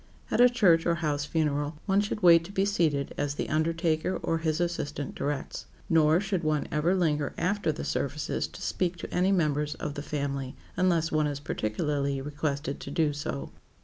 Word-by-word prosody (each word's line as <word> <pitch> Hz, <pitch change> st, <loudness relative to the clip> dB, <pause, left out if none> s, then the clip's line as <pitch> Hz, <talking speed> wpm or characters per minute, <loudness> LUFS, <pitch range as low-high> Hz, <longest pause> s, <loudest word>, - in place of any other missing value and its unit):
At -, -, +3 dB
a 250 Hz, -, +8 dB
church 185 Hz, -10 st, +4 dB
or 170 Hz, -, +3 dB
house 150 Hz, -3 st, -1 dB
funeral, 150 Hz, -1 st, 0 dB
one 195 Hz, 0 st, +3 dB
should 205 Hz, 0 st, -3 dB
wait 170 Hz, -2 st, +7 dB
to 190 Hz, -, -9 dB
be 195 Hz, 0 st, +1 dB
seated 160 Hz, -8 st, +1 dB
as 145 Hz, 0 st, -1 dB
the -, -, -3 dB
undertaker 165 Hz, +2 st, 0 dB
or 165 Hz, -, 0 dB
his 160 Hz, 0 st, 0 dB
assistant 155 Hz, -5 st, -2 dB
directs. 145 Hz, -1 st, -4 dB, 0.2 s
Nor 160 Hz, 0 st, +5 dB
should 195 Hz, -3 st, -2 dB
one 155 Hz, -2 st, 0 dB
ever 160 Hz, +5 st, +2 dB
linger 150 Hz, -6 st, 0 dB
after 195 Hz, -2 st, 0 dB
the 155 Hz, -, -5 dB
services 145 Hz, +2 st, -2 dB
to -, -, -10 dB
speak 180 Hz, -1 st, -1 dB
to -, -, -7 dB
any 185 Hz, +2 st, +3 dB
members 150 Hz, -5 st, +1 dB
of 150 Hz, -, -4 dB
the 145 Hz, -, -5 dB
family, 140 Hz, -3 st, -3 dB, 0.2 s
unless 175 Hz, -3 st, +2 dB
one 155 Hz, -1 st, +2 dB
is 145 Hz, -1 st, -3 dB
particularly 140 Hz, +3 st, -1 dB
requested 145 Hz, 0 st, -3 dB
to -, -, -7 dB
do 150 Hz, 0 st, +1 dB
so. 145 Hz, -1 st, -4 dB
155 Hz, 185 wpm, -28 LUFS, 145-175 Hz, 0.2 s, a